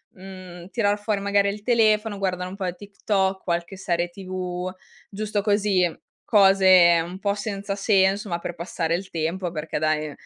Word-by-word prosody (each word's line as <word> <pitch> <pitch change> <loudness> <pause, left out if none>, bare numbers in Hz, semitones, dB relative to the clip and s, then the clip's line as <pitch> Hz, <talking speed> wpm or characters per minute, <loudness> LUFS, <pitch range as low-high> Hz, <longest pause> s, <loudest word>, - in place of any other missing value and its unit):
mhmm, 185 -2 -11
tirar 205 -3 +1
fuori 205 -1 -1
magari 200 0 +2
il 205 +1 -5
telefono, 215 -2 +2
guardare 180 -2 -2
un 190 - -8
po' 185 -3 -3
TikTok, 195 0 -2
qualche 175 +2 -3
serie 175 -2 -1
TV, 185 -1 -5 0.4
giusto 210 0 -2
così, 200 -5 +2 0.3
cose 190 -4 +6
un 180 +3 -8
po' 200 0 0
senza 200 -1 -4
senso, 195 0 +2
ma 170 -1 -2
per 170 0 -6
passare 170 -1 -2
il 185 +2 -6
tempo, 170 +2 -2
perché 155 -1 -4
dai 155 0 0
190 Hz, 160 wpm, -24 LUFS, 175-205 Hz, 0.4 s, cose